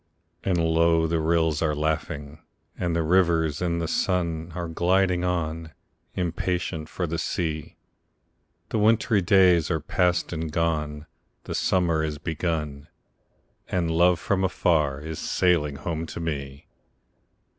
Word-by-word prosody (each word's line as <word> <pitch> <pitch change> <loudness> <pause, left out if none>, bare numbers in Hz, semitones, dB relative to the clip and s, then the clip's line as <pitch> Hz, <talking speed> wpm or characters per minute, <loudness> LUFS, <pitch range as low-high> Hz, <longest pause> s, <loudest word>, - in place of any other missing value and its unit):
And 95 -2 +1
low 80 0 +3
the 80 0 0
rills 80 -1 +1
are 75 -2 +1
laughing, 75 -1 -3 0.4
and 85 -2 -1
the 85 - +1
rivers 80 -3 +2
in 85 -1 0
the 85 -1 -2
sun 85 -3 -1
Are 85 -1 -3
gliding 90 +2 +1
on, 80 -2 -2 0.4
impatient 85 -2 -2
for 90 - -3
the 85 0 -3
sea; 80 -3 -3 0.9
The 110 - -1
wintry 110 0 +3
days 90 -4 +4
are 80 -3 0
past 90 +3 0
and 80 -1 -3
gone, 75 -2 -1 0.4
the - - -6
summer 85 -4 +1
is 75 -1 -3
begun, 75 -3 -3 0.8
And 85 -3 -1
love 85 +1 +4
from 95 +2 0
far 75 -7 +1
is 80 0 -6
sailing 85 -6 +1
home 80 +2 -4
to - - -7
me! 70 -3 -5
80 Hz, 135 wpm, -25 LUFS, 80-90 Hz, 0.9 s, days